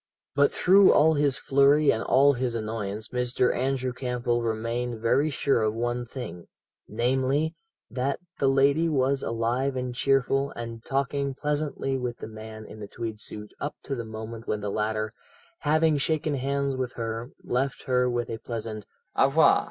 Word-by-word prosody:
"But 140 Hz, 0 st, +4 dB
through 195 Hz, +1 st, +6 dB
all 160 Hz, +2 st, +5 dB
his 145 Hz, -3 st, +2 dB
flurry 140 Hz, +2 st, +4 dB
and 110 Hz, -, -1 dB
all 140 Hz, +2 st, +5 dB
his 125 Hz, -2 st, -2 dB
annoyance 110 Hz, -1 st, -3 dB
Mr. 125 Hz, 0 st, +1 dB
Andrew 130 Hz, 0 st, -1 dB
Campbell 125 Hz, -2 st, -1 dB
remained 115 Hz, +1 st, -2 dB
very 130 Hz, +7 st, +2 dB
sure 140 Hz, -3 st, +1 dB
of 110 Hz, 0 st, 0 dB
one 120 Hz, +1 st, -2 dB
thing; 100 Hz, -9 st, -7 dB, 0.4 s
namely, 130 Hz, +7 st, +1 dB, 0.4 s
that 130 Hz, +2 st, -1 dB, 0.2 s
the 135 Hz, -, +3 dB
lady 140 Hz, +5 st, +3 dB
was 135 Hz, -2 st, +1 dB
alive 120 Hz, +4 st, -1 dB
and 125 Hz, -1 st, -3 dB
cheerful, 135 Hz, +1 st, +2 dB
and 115 Hz, -1 st, -6 dB
talking 140 Hz, 0 st, -1 dB
pleasantly 145 Hz, -2 st, -1 dB
with 120 Hz, -1 st, -3 dB
the -, -, -7 dB
man 110 Hz, 0 st, -9 dB
in 110 Hz, -, -11 dB
the 105 Hz, -, -7 dB
tweed 110 Hz, 0 st, -5 dB
suit 105 Hz, -1 st, -6 dB
up 145 Hz, -, -3 dB
to 140 Hz, -, -4 dB
the 120 Hz, -3 st, -3 dB
moment 110 Hz, +1 st, -8 dB
when 105 Hz, -1 st, -1 dB
the 100 Hz, -1 st, -3 dB
latter, 110 Hz, +1 st, -1 dB, 0.5 s
having 155 Hz, 0 st, +2 dB
shaken 155 Hz, +1 st, 0 dB
hands 140 Hz, 0 st, -1 dB
with 130 Hz, -1 st, -3 dB
her, 115 Hz, +1 st, -4 dB
left 135 Hz, +2 st, -1 dB
her 125 Hz, -2 st, +2 dB
with 120 Hz, -1 st, -2 dB
a 115 Hz, -, -4 dB
pleasant 110 Hz, -2 st, -5 dB, 0.3 s
'Au 135 Hz, -, +5 dB
revoir! 155 Hz, +4 st, +5 dB
125 Hz, 165 wpm, -26 LUFS, 115-140 Hz, 0.5 s, through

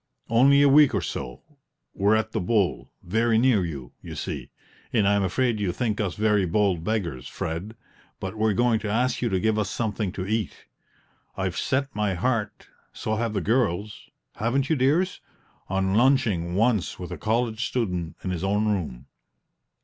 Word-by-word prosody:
"Only 140 Hz, +5 st, +6 dB
a -, -, +6 dB
week 145 Hz, 0 st, +6 dB
or -, -, +1 dB
so; 60 Hz, +2 st, -5 dB, 0.5 s
we're 100 Hz, +2 st, +3 dB
at 110 Hz, 0 st, 0 dB
the -, -, -1 dB
'Bull,' 100 Hz, 0 st, 0 dB
very 110 Hz, +5 st, +2 dB
near 115 Hz, -5 st, +4 dB
you, 70 Hz, -8 st, -6 dB
you -, -, -8 dB
see; -, -, -5 dB, 0.4 s
and 105 Hz, -5 st, +2 dB
I'm 100 Hz, 0 st, +3 dB
afraid 110 Hz, +4 st, 0 dB
you 100 Hz, -3 st, 0 dB
think 110 Hz, 0 st, -1 dB
us 95 Hz, -4 st, -2 dB
very 105 Hz, -2 st, +2 dB
bold 90 Hz, -1 st, +1 dB
beggars, 85 Hz, -, -2 dB
Fred, 90 Hz, +8 st, -5 dB, 0.4 s
but 95 Hz, +2 st, -5 dB
we're 110 Hz, -1 st, +1 dB
going 120 Hz, 0 st, +3 dB
to 110 Hz, -, -4 dB
ask 125 Hz, +4 st, 0 dB
you 120 Hz, -, +1 dB
to 95 Hz, -2 st, 0 dB
give 110 Hz, +2 st, +1 dB
us 100 Hz, -2 st, -1 dB
something 110 Hz, -3 st, -2 dB
to 95 Hz, -2 st, -4 dB
eat. 110 Hz, -1 st, -3 dB, 0.7 s
I've -, -, -2 dB
set 135 Hz, +1 st, -1 dB
my 105 Hz, -3 st, 0 dB
heart, 105 Hz, +1 st, -2 dB, 0.2 s
so 110 Hz, 0 st, -3 dB
have 115 Hz, -1 st, -1 dB
the 100 Hz, -, -1 dB
girls 105 Hz, -1 st, -1 dB, 0.3 s
(haven't 130 Hz, +6 st, 0 dB
you, -, -, +4 dB
dears?), 155 Hz, +8 st, +1 dB, 0.5 s
on 95 Hz, 0 st, 0 dB
lunching 110 Hz, -8 st, +2 dB
once 110 Hz, -2 st, +1 dB
with 90 Hz, -, -7 dB
a -, -, -5 dB
college 115 Hz, +1 st, 0 dB
student 90 Hz, -9 st, -2 dB
in 95 Hz, -, -2 dB
his 90 Hz, -1 st, -3 dB
own 105 Hz, +2 st, +1 dB
room." 75 Hz, -11 st, -3 dB
105 Hz, 175 wpm, -25 LUFS, 95-120 Hz, 0.7 s, Only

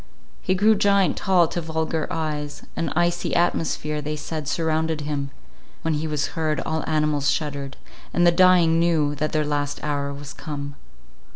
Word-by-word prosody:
He 185 Hz, -, +1 dB
grew 210 Hz, +4 st, +5 dB
giant 200 Hz, -2 st, +3 dB
tall 180 Hz, -4 st, +3 dB
to 175 Hz, -, -3 dB
vulgar 160 Hz, -1 st, -2 dB
eyes; 150 Hz, -2 st, -3 dB
an 165 Hz, -, -1 dB
icy 175 Hz, +1 st, +1 dB
atmosphere, 155 Hz, -3 st, 0 dB
they 150 Hz, +1 st, -3 dB
said, 155 Hz, -1 st, -5 dB
surrounded 160 Hz, 0 st, 0 dB
him; 145 Hz, -1 st, -3 dB, 0.5 s
when 160 Hz, -, +1 dB
he 155 Hz, +1 st, -1 dB
was 150 Hz, -2 st, -1 dB
heard, 155 Hz, -2 st, 0 dB
all 160 Hz, 0 st, -2 dB
animals 150 Hz, -2 st, +1 dB
shuddered, 140 Hz, -3 st, -2 dB, 0.3 s
and 175 Hz, -, +2 dB
the 175 Hz, -, +7 dB
dying 170 Hz, -2 st, +5 dB
knew 160 Hz, -4 st, +2 dB
that 155 Hz, +1 st, -2 dB
their 155 Hz, -1 st, +1 dB
last 145 Hz, -1 st, -1 dB
hour 145 Hz, -1 st, -1 dB
was 140 Hz, +1 st, -8 dB
come. 145 Hz, -2 st, -6 dB
155 Hz, 165 wpm, -23 LUFS, 150-170 Hz, 0.5 s, the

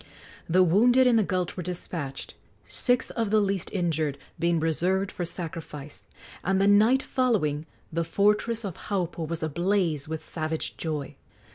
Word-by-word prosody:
The 185 Hz, +3 st, +5 dB
wounded 240 Hz, +9 st, +5 dB
in 250 Hz, -2 st, +5 dB
the 220 Hz, -, +4 dB
gulch 185 Hz, -2 st, -1 dB
were 180 Hz, -, -4 dB
despatched, 165 Hz, -5 st, -5 dB, 0.3 s
six 245 Hz, -1 st, 0 dB
of 225 Hz, -3 st, -1 dB
the 215 Hz, +1 st, +4 dB
least 195 Hz, -3 st, 0 dB
injured 160 Hz, -6 st, 0 dB, 0.2 s
being 170 Hz, 0 st, +2 dB
reserved 180 Hz, +5 st, +1 dB
for 175 Hz, -, -3 dB
sacrifice, 160 Hz, -4 st, -7 dB, 0.4 s
and 190 Hz, +1 st, +2 dB
the 195 Hz, -, +4 dB
night 215 Hz, +6 st, +5 dB
following 175 Hz, -, 0 dB, 0.3 s
the 170 Hz, +1 st, +1 dB
fortress 210 Hz, +5 st, +1 dB
of 185 Hz, -4 st, -4 dB
Haupu 175 Hz, -5 st, -2 dB
was 165 Hz, 0 st, -4 dB
ablaze 170 Hz, -2 st, 0 dB
with 160 Hz, 0 st, -5 dB
savage 160 Hz, -1 st, -3 dB
joy. 150 Hz, -3 st, -4 dB
175 Hz, 150 wpm, -27 LUFS, 160-205 Hz, 0.4 s, The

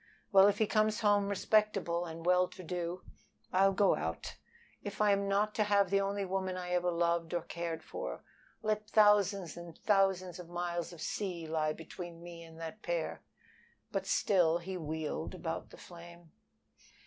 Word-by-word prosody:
Well, 195 Hz, -1 st, +8 dB
if 205 Hz, -, +2 dB
he 220 Hz, -, +3 dB
comes 215 Hz, +1 st, +1 dB
home 205 Hz, -2 st, +3 dB
respectable 200 Hz, -4 st, +1 dB
and 165 Hz, 0 st, -8 dB
well 180 Hz, 0 st, +4 dB
to 185 Hz, -, -11 dB
do 175 Hz, +1 st, -4 dB, 0.5 s
I'll 195 Hz, +1 st, +5 dB
go 195 Hz, 0 st, +4 dB
out. -, -, -4 dB, 0.5 s
If 205 Hz, -, -7 dB
I 210 Hz, -1 st, +4 dB
am 200 Hz, 0 st, +1 dB
not 205 Hz, +2 st, +1 dB
to 215 Hz, -, +2 dB
have 200 Hz, -2 st, +3 dB
the 195 Hz, 0 st, +4 dB
only 200 Hz, 0 st, -1 dB
woman 190 Hz, 0 st, -2 dB
I 180 Hz, -1 st, -5 dB
ever 180 Hz, 0 st, +2 dB
loved 170 Hz, 0 st, 0 dB
or 170 Hz, -, -1 dB
cared 165 Hz, -1 st, -4 dB
for, -, -, -6 dB, 0.4 s
let 215 Hz, 0 st, -1 dB
thousands 205 Hz, -4 st, +4 dB
and 170 Hz, -1 st, -10 dB
thousands 190 Hz, -3 st, +2 dB
of 175 Hz, -1 st, -9 dB
miles 175 Hz, -1 st, -3 dB
of 170 Hz, -2 st, -11 dB
sea 180 Hz, -4 st, -3 dB
lie 155 Hz, -1 st, 0 dB
between 170 Hz, +1 st, -9 dB
me 170 Hz, -1 st, -9 dB
and 165 Hz, -1 st, -12 dB
that 165 Hz, +6 st, -7 dB
pair." 170 Hz, -2 st, -2 dB, 0.7 s
But -, -, -2 dB
still 175 Hz, -5 st, +3 dB
he 185 Hz, +2 st, -6 dB
wheeled 160 Hz, 0 st, -4 dB
about 165 Hz, -3 st, -4 dB
the -, -, -13 dB
flame. 170 Hz, -1 st, -13 dB
180 Hz, 170 wpm, -33 LUFS, 170-200 Hz, 0.7 s, Well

